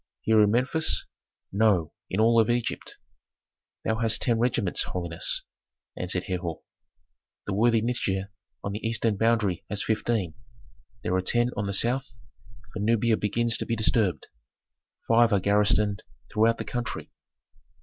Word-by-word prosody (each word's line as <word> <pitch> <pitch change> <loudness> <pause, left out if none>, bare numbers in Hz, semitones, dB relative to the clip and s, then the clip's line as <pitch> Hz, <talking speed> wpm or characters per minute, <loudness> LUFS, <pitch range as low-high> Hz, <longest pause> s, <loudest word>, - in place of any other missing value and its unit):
"Here 110 -1 +4
in 105 - +4
Memphis?" 130 +8 +2 0.5
"No, 100 -6 +2 0.2
in 95 - -2
all 115 +1 +5
Egypt." 120 0 -2 0.9
"Thou 110 - 0
hadst 115 0 +1
ten 115 -2 +1
regiments, 115 -6 +1
holiness," 85 -2 -1 0.5
answered 90 0 -1
Herhor. 90 -3 -4 0.8
"The 100 - -3
worthy 115 +2 +3
Nitager 100 -5 -1 0.3
on 100 - -3
the 105 - -4
eastern 115 -1 0
boundary 110 -4 +1
has 100 0 -2
fifteen. 110 -5 -1 0.7
There - - -1
are 95 - +2
ten 120 +6 +1
on 100 - -2
the - - -2
south, 120 +3 +1 0.6
for - - -5
Nubia 115 +2 +2
begins 115 +3 +1
to - - -3
be 115 - 0
disturbed; 105 -6 +1 0.8
five 115 0 +4
are 100 - +3
garrisoned 105 0 +2 0.3
throughout 115 +2 +3
the - - -5
country." 120 -1 -5
110 Hz, 140 wpm, -26 LUFS, 100-115 Hz, 0.9 s, all